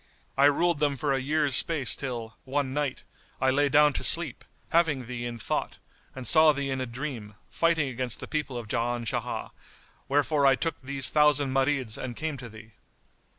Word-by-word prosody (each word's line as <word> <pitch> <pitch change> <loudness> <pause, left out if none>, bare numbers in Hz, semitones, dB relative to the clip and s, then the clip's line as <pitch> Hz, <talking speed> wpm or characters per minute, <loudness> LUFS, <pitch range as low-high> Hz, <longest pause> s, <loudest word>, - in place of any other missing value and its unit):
I 140 - +4
ruled 160 +3 +3
them 145 -2 +1
for 140 0 0
a 135 - 0
year's 145 +1 0
space 145 -6 +2
till, 120 -4 -5
one 135 0 -2
Night, 145 -2 -2 0.4
I 130 0 +2
lay 145 +2 +2
down 150 0 +5
to - - -2
sleep, 160 -7 0 0.3
having 155 -6 +2
thee 120 0 -5
in 120 -1 -6
thought, 110 - -3 0.4
and 130 -1 -7
saw 155 +4 +6
thee 140 -1 -3
in 130 0 -2
a 130 - -3
dream, 120 -4 -6 0.2
fighting 165 -3 +1
against 125 -2 -3
the - - -7
people 150 -5 -3
of 120 -2 -7
Jan 120 +1 -2
Shah; - - -3 0.6
wherefore 145 0 +2
I 135 - +5
took 165 +2 -3
these 135 0 +1
thousand 145 -3 +3
Marids 135 -4 0
and 125 -2 -5
came 155 +2 -3
to 120 -2 -9
thee." 110 +1 -13
135 Hz, 190 wpm, -27 LUFS, 125-150 Hz, 0.6 s, saw